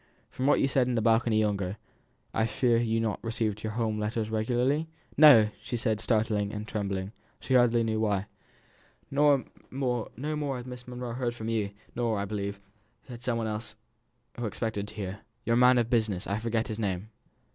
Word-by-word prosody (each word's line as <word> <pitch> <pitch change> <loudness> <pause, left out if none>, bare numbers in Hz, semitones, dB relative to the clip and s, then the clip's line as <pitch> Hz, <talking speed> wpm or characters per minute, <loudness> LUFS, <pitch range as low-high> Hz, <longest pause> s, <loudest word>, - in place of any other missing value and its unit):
"From 130 - -1
what 145 - +5
you - - +3
said 130 -2 +2
in 125 - 0
the 115 - +1
balcony 115 -1 +3
yonder, 100 -2 -1 0.6
I 110 - +2
fear 120 -1 +2
you 115 -1 +1
have 115 - +1
not 110 -3 -2
received 110 -2 -1
your 110 -1 -3
home 110 -2 -1
letters 110 +1 -2
regularly?" 125 +8 +1 0.3
"No!" 150 -2 +10
replied 105 0 -1
she, 120 +3 -3
startled 110 -2 0
and 105 0 -5
trembling, 100 -2 -3 0.3
she 130 - -2
hardly 120 -2 +5
knew 110 -1 0
why. 105 -3 +1 0.9
"No 140 -1 +4 0.3
more 135 +3 -2
has 120 - -7
Miss 125 -1 -8
Monro 125 -1 -5
heard 120 -1 -2
from 110 -1 -5
you; 110 -3 0 0.3
nor, 115 -3 0
I 100 - -1
believe, 100 -1 -4 0.5
has 120 -1 -8
some 120 -2 0
one 115 - -1
else 110 +1 -4 0.6
who 120 - -1
expected 105 -1 -3
to - - -11
hear. 100 -1 -5 0.3
Your 115 - +2
man 125 +1 +6
of 120 -1 +1
business 110 -6 +1
I 100 +2 -1
forget 115 0 -1
his 110 -2 -4
name." 100 0 -2
115 Hz, 190 wpm, -29 LUFS, 105-125 Hz, 0.9 s, No